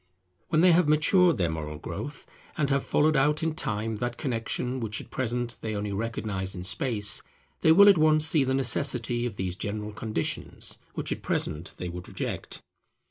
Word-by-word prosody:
When 160 -1 +2
they 180 0 +6
have 170 -1 +4
matured 165 +3 +4
their 85 -4 0
moral 75 -1 -5
growth, 110 - -7 0.3
and 145 -3 +1
have 140 0 +2
followed 155 +1 +2
out 150 +3 +2
in 160 -1 0
Time 110 -5 -2
that 120 +1 -3
connexion 125 0 -2
which 110 -3 -3
at - - -12
present 120 -1 -3
they 110 -1 -3
only 105 0 -3
recognize 100 -3 -2
in 90 - -6
Space, 105 +1 0 0.4
they 160 - +4
will 200 +5 +8
at 195 -5 +7
once 155 0 +5
see 155 -3 +3
the 130 0 0
necessity 125 -2 +1
of 110 - -7
these 95 -2 -3
general 105 +2 -4
conditions 110 -5 -3 0.2
which - - -3
at - - -3
present 80 +3 -2
they 90 - -5
would 90 0 -7
reject. - - -5
120 Hz, 185 wpm, -27 LUFS, 105-150 Hz, 0.4 s, will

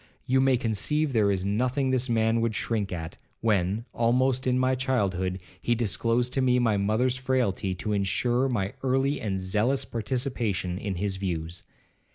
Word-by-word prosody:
You 130 +1 +3
may 135 -1 +4
conceive 135 +7 0
there 105 -3 +3
is 95 -1 0
nothing 125 +6 0
this 130 0 +1
man 115 0 +2
would 115 -2 0
shrink 105 -4 -1
at, 80 -2 -5 0.2
when, 105 0 +1
almost 130 +2 +2
in 125 0 +2
my 130 0 +2
childhood, 100 -9 0 0.2
he 120 - +1
disclosed 120 +2 0
to 135 - +1
me 125 -1 +3
my 115 -4 +2
mother's 110 +6 +1
frailty, 125 -8 0
to 105 +3 -3
insure 120 +6 +1
my 100 -5 -1
early 135 +2 +1
and 95 -3 -2
zealous 110 +9 0
participation 115 -6 -2
in 100 -3 -3
his 95 +1 -2
views. 85 -2 -4
115 Hz, 165 wpm, -27 LUFS, 100-130 Hz, 0.2 s, may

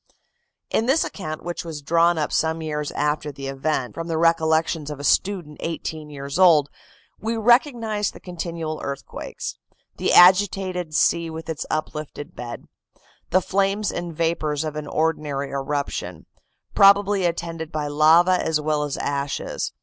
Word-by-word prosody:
In 225 - +1
this 275 +5 +3
account, 155 -6 -6
which 175 0 -4
was 160 -4 -7
drawn 170 +3 +3
up 150 - -1
some 160 0 0
years 150 -1 -3
after 150 0 -1
the 140 0 -8
event, 135 -1 -2
from 165 0 -5
the 165 -1 -1
recollections 160 -1 +2
of 150 -2 -6
a - - -7
student 175 0 +1
eighteen 160 -2 -5
years 140 +2 -5
old, 155 -6 +5 0.5
we 225 +1 -2
recognize 230 -3 +2
the - - -12
continual 165 -3 -5
earthquakes; 140 -1 -6 0.4
the - - 0
agitated 185 -2 +4
sea 170 +1 +2
with 160 0 -8
its 160 - -4
uplifted 155 -1 -4
bed; 120 -1 -7 0.6
the 185 - +3
flames 200 +2 0
and 175 -2 -5
vapors 160 -3 0
of 155 -1 -4
an 150 -1 -5
ordinary 150 -3 -1
eruption, 135 - -3 0.5
probably 200 0 +5
attended 165 -2 -3
by 155 -1 -2
lava 160 +5 +4
as 160 -1 +1
well 150 0 0
as 145 -2 -3
ashes. 140 0 -3
160 Hz, 150 wpm, -23 LUFS, 150-175 Hz, 0.6 s, old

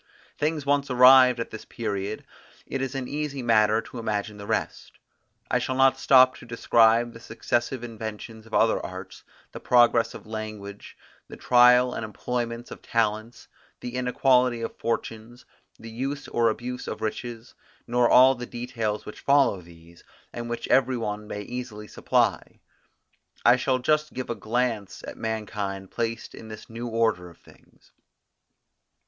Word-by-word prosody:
Things 150 -1 -1
once 140 0 +1
arrived 125 0 +7
at 115 - -4
this 110 - -8
period, 105 -2 -4 0.4
it 135 - -4
is 135 0 -3
an 130 -2 -3
easy 145 -2 -4
matter 110 -1 +3
to 125 - -9
imagine 105 -1 -3
the 100 0 -9
rest. - - -3 0.6
I 125 - +3
shall 130 +1 -2
not 135 0 +4
stop 130 -1 +6
to - - -13
describe 115 0 +3
the 115 - -11
successive 120 +2 -2
inventions 110 -1 -8
of 110 - -18
other 115 - +2
arts, 95 0 -9 0.3
the - - -8
progress 120 -1 +3
of - - -11
language, 110 -2 -8 0.3
the - - -11
trial 125 0 +5
and - - -4
employments 120 +2 -4
of - - -9
talents, 115 0 -2 0.3
the 120 - -7
inequality 125 -1 +2
of 115 - -5
fortunes, 115 +1 -5 0.3
the 115 0 -11
use 135 +5 -4
or 115 -1 +2
abuse 125 +3 -5
of - - -5
riches, 115 +2 -5 0.3
nor 120 0 +2
all 130 +1 +7
the 125 -1 -7
details 115 -3 -4
which 105 - -9
follow 140 -9 +3
these, 85 0 -17 0.3
and 120 0 -6
which 120 - -4
every 130 -1 +3
one 105 -2 -4
may 105 - -5
easily 115 -2 -7
supply. - - -1 0.9
I 120 - +7
shall 130 +1 0
just 150 +4 0
give 130 -1 -4
a - - 0
glance 115 -3 -2
at - - -7
mankind 105 -3 -4
placed 115 -1 -4
in 110 - -11
this 110 +1 -11
new 115 +1 -5
order 115 -6 0
of 85 - -18
things. - - -23
115 Hz, 155 wpm, -25 LUFS, 110-125 Hz, 0.9 s, arrived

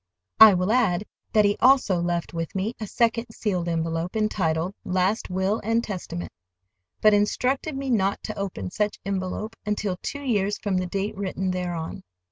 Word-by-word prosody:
I 220 -3 +10
will 180 +3 +1
add 215 -6 +2 0.3
that 215 -1 +4
he 205 0 +2
also 255 -9 +4
left 175 -1 -2
with 165 +1 -4
me 195 +5 -1
a 215 - -4
second 230 +2 +1
sealed 185 -6 -2
envelope 165 +1 -2
entitled 185 -5 0
"Last 185 +4 0
Will 190 +4 0
and 225 +2 +1
Testament," 175 -4 -5 0.7
but 215 0 +6
instructed 260 +8 +1
me 270 -1 -2
not 200 -4 +1
to 215 - -5
open 190 - -4
such 210 0 -1
envelope 200 +3 -3
until 205 -3 -1
two 285 0 -5
years 205 -5 +1
from 200 -3 -1
the 185 0 -1
date 200 +3 -2
written 190 -1 -2
thereon. 175 -3 -4
200 Hz, 165 wpm, -25 LUFS, 180-215 Hz, 0.7 s, I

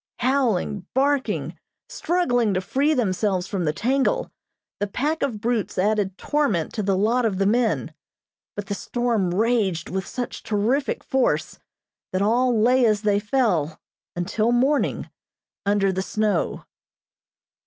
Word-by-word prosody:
Howling, 235 -7 0
barking, 275 0 0 0.3
struggling 245 - 0
to 185 - +1
free 285 +10 +1
themselves 195 -5 0
from 190 -3 -2
the 150 - +2
tangle, 270 - 0 0.5
the 205 - -1
pack 295 +10 -2
of 245 -7 -1
brutes 230 -2 -1
added 200 0 +1
torment 255 - 0
to 215 - -2
the 195 -1 +1
lot 230 +5 +2
of 215 -5 0
the 195 - +1
men; 230 +3 +1 0.6
but 205 - -4
the 200 - -3
storm 230 -4 -1
raged 200 -4 +1
with 190 0 -3
such 245 -1 -5
terrific 230 +7 0
force 265 -1 0 0.5
that 185 - 0
all 240 +2 +2
lay 250 +3 +4
as 215 -2 +2
they 205 -1 +2
fell, 205 - 0 0.4
until 210 +6 0
morning, 265 +4 +1 0.6
under 200 -1 +2
the 190 - -1
snow. 210 -2 -1
215 Hz, 135 wpm, -23 LUFS, 195-250 Hz, 0.6 s, lay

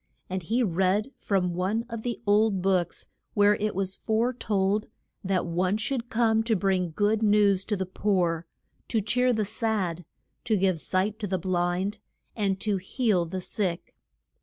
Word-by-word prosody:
And 185 0 -1
he 230 +9 0
read 195 +5 +1
from 180 -3 0
one 195 +6 -1
of 230 -2 -5
the 240 0 -3
old 205 -2 +3
books 185 -3 0 0.3
where 205 0 +5
it 210 -1 -2
was 190 0 -1
fore 230 +3 0
told 210 -2 0 0.4
that 190 -1 0
one 180 +4 0
should 240 +2 -2
come 225 -2 +2
to 225 -1 +2
bring 185 -2 +1
good 205 +6 +1
news 205 -3 +4
to 210 - 0
the 190 - -2
poor, 175 -3 0 0.4
to 225 - +1
cheer 250 +5 +2
the 215 -3 0
sad, 205 -5 -1 0.4
to 220 -3 +2
give 185 -3 +1
sight 195 +6 -1
to 210 - -3
the 190 0 0
blind, 185 +3 -1 0.4
and 195 -3 0
to 210 -2 0
heal 190 -1 0
the 185 +3 -4
sick. 180 -2 -3
200 Hz, 165 wpm, -27 LUFS, 185-220 Hz, 0.4 s, where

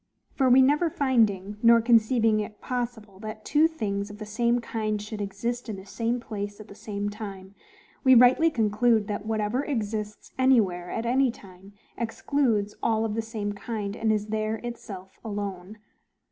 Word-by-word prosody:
For 265 -2 +2
we 260 +1 +7
never 295 +5 +3
finding, 215 -9 +1
nor 235 0 +7
conceiving 225 -1 +3
it 210 0 -5
possible, 235 -6 -4
that 215 +1 -8
two 305 +2 +4
things 205 -10 -3
of 205 - -10
the 215 - -7
same 235 +3 +1
kind 215 -2 -2
should 210 0 -6
exist 230 +5 -3
in 215 - -3
the 190 0 -10
same 230 +4 -2
place 205 -3 -6
at 215 - -11
the - - -10
same 205 0 -4
time, 195 -2 -8 0.5
we 260 -2 +7
rightly 250 +7 +6
conclude, 220 -3 +2
that, 210 +1 -4
whatever 220 +4 0
exists 210 -6 -4
anywhere 200 -10 +3
at 225 - -3
any 260 +2 +3
time, 195 -3 -12 0.3
excludes 230 -3 0
all 225 -1 +1
of 215 - -2
the 225 - -1
same 220 -2 -4
kind, 205 -1 -4
and 225 -1 +1
is 210 0 -1
there 215 0 -1
itself 200 -6 -8
alone. 200 -2 -5
220 Hz, 170 wpm, -26 LUFS, 205-240 Hz, 0.5 s, we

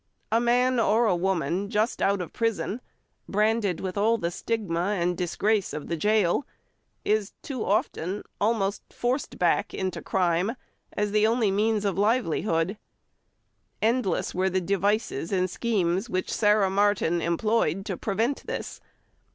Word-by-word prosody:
A 225 - +4
man 245 +1 +3
or 230 +1 +3
a 195 -5 +3
woman 185 +1 -1
just 215 +2 0
out 200 -1 +2
of 175 - -7
prison, 230 0 -1 0.5
branded 210 -3 +1
with 190 +1 -3
all 225 +3 +3
the 170 -5 -2
stigma 200 -2 -1
and 175 +1 +1
disgrace 200 +4 0
of 150 - -6
the 170 - 0
gaol, 210 - +2 0.6
is 210 -1 +1
too 270 -8 -4
often 195 -1 -1 0.2
almost 205 -2 +1
forced 250 +4 -2
back - - +1
into 190 -1 -3
crime 180 +4 +1 0.4
as 210 0 -1
the 215 +1 +4
only 225 -3 +2
means 210 +1 +1
of 195 -2 0
livelihood. 200 -4 +1 1.0
Endless 225 -5 0
were 185 +1 +1
the 185 0 +1
devices 200 -2 0
and 185 -2 +1
schemes 195 -2 0
which 185 -2 -2
Sarah 210 -2 +3
Martin 195 -4 +2
employed 195 +1 0
to 195 - -3
prevent 225 +9 -1
this. - - -5
205 Hz, 145 wpm, -26 LUFS, 185-220 Hz, 1.0 s, A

